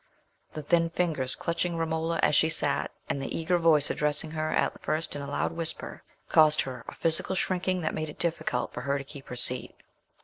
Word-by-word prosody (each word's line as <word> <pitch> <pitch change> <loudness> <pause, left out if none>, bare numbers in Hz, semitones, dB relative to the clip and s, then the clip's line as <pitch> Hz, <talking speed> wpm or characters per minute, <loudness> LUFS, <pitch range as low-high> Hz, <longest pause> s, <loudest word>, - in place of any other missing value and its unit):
The 155 - -5
thin 165 +2 +2
fingers 160 -7 -1
clutching 170 0 -2
Romola 165 0 -1
as - - +4
she 160 +2 +4
sat, 145 -3 +3 0.2
and 140 - -2
the 135 - -3
eager 175 +2 +1
voice 155 -3 +4
addressing 150 +1 -1
her 155 0 -2
at - - 0
first 155 0 -1
in 145 - -4
a 140 - -6
loud - - -1
whisper, 165 -1 -2 0.3
caused 155 -1 +5
her 125 -3 -6
a - - -8
physical 165 +3 +1
shrinking 185 0 0
that 160 - -1
made 155 0 -3
it 150 - -10
difficult 160 -7 -1
for - - -5
her 140 +2 0
to 140 - -5
keep 140 0 -11
her 125 - -6
seat. 125 +1 -1
155 Hz, 205 wpm, -28 LUFS, 145-165 Hz, 0.3 s, caused